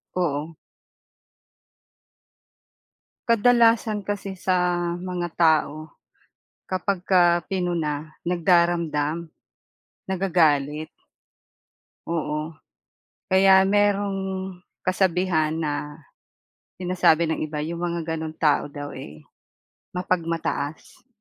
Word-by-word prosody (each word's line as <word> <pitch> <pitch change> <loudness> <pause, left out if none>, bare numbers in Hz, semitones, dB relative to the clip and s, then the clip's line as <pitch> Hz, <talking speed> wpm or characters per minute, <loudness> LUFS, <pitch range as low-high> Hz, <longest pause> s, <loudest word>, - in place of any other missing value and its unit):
Oo. 160 -2 -1 2.7
Kadalasan 230 -2 +3
kasi 200 -2 -4
sa 180 -1 +1 0.2
mga 180 -1 -3
tao, 155 -2 +2 0.8
'kapagka 180 -3 +2
pinuna, 165 -5 -2 0.2
nagdaramdam, 170 -2 +1 0.8
nagagalit, 155 -5 +1 1.2
oo. 155 -1 -3 0.7
Kaya 190 0 +5
merong 200 -1 +1 0.6
kasabihan 180 -4 +1
na, 150 -1 -3 0.8
"Sinasabi 180 -2 +3
ng 160 0 -2
iba 155 0 -4
yung 170 +1 -5
mga 170 -2 -2
ganong 160 -1 -5
tao 150 -2 +2
daw, 145 0 -7
eh, 75 - -10 0.7
mapagmataas." 165 - -3
170 Hz, 70 wpm, -24 LUFS, 155-185 Hz, 2.7 s, Kaya